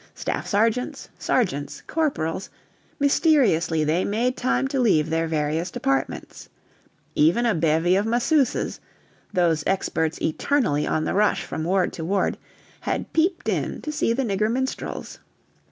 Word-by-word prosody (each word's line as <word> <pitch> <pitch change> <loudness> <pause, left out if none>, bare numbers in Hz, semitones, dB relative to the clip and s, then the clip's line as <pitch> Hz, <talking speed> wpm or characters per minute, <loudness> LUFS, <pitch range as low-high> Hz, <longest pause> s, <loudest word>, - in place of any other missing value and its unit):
Staff - - -3
Sergeants, 225 +4 0
Sergeants, 145 - -1
Corporals 190 - -1 0.5
mysteriously 260 - +3
they 160 +4 +1
made 240 +5 0
time 265 +1 0
to 275 - -1
leave 160 -10 +3
their 165 0 +1
various 160 +2 -1
departments. 135 -4 -3 0.6
Even 170 +11 +3
a 230 - +3
bevy 165 +2 +2
of 205 +3 +1
masseuses 245 +4 +1 0.5
(those 170 -5 +2
experts 160 -4 0
eternally 160 - 0
on 155 - 0
the - - -1
rush 210 +1 +2
from 160 - -4
ward 185 +1 +1
to 165 - -5
ward) 190 +4 0 0.4
had - - -3
peeped 340 +2 +1
in - - -1
to 305 - -3
see 295 - 0
the 260 +4 0
nigger 215 -1 0
minstrels. 260 +2 -4
195 Hz, 135 wpm, -24 LUFS, 160-250 Hz, 0.6 s, mysteriously